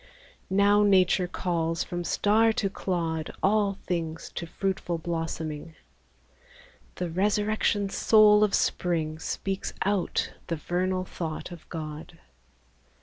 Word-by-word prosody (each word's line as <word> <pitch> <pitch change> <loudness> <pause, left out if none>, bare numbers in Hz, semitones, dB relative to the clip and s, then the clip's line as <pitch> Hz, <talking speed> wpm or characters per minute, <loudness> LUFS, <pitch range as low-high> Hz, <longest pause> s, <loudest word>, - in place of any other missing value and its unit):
Now 200 +2 +4
Nature 185 -3 +4
calls 165 -2 -1
from 175 0 -4
star 220 +5 +3
to 195 -3 -1
clod 165 -5 -2
All 200 -1 +2
things 165 -2 -3
to 170 - -5
fruitful 190 -1 -2
blossoming: 165 -2 -4 1.2
The 180 -2 -3
resurrection 205 +2 +1
soul 210 0 +5
of 210 - +3
Spring 160 -3 0
Speaks 195 +4 -3
out 200 -2 0
the 165 - -1
vernal 185 +3 -1
thought 165 -1 -5
of 170 -2 -11
God. 155 +1 -7
180 Hz, 110 wpm, -27 LUFS, 165-200 Hz, 1.2 s, soul